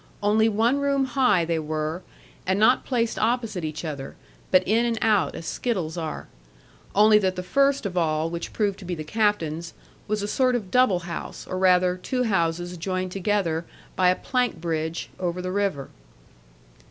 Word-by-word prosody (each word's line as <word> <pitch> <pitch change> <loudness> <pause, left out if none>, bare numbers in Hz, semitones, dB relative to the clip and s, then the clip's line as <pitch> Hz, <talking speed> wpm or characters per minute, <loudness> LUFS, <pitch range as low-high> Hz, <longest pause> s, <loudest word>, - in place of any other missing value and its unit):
Only 220 +2 +4
one 230 +6 +2
room 280 -1 +1
high 245 -9 +2
they 165 -1 0
were, 155 +2 -3 0.5
and 190 +1 +1
not 235 +4 +4
placed 235 -3 0
opposite 225 -5 0
each 155 +2 -4
other, 140 -3 -6 0.3
but 185 0 +4
in 225 +4 +3
and 235 -1 0
out 205 -9 +2
as 165 - -7
skittles 180 -7 -2
are; 160 -3 -5 0.7
only 210 +1 +6
that 190 -2 0
the 180 - -4
first 275 +6 +2
of 190 -2 -3
all, 160 -2 +1
which 170 0 -5
proved 205 -3 -1
to 195 - -10
be 175 0 -3
the 155 - -6
captain's, 170 -4 -1 0.3
was 210 -1 -1
a - - -2
sort 255 +3 +2
of 205 -6 -4
double 250 -7 +3
house, 170 0 -7
or 185 - -4
rather 180 -1 +4
two 250 +7 -2
houses 175 -4 0
joined 185 +1 -3
together 190 -4 0 0.3
by 185 -1 +4
a 180 - +3
plank 250 -2 -1
bridge, 160 0 -3
over 180 -1 -2
the 185 0 -3
river. 195 -8 -1
185 Hz, 175 wpm, -25 LUFS, 170-220 Hz, 0.7 s, only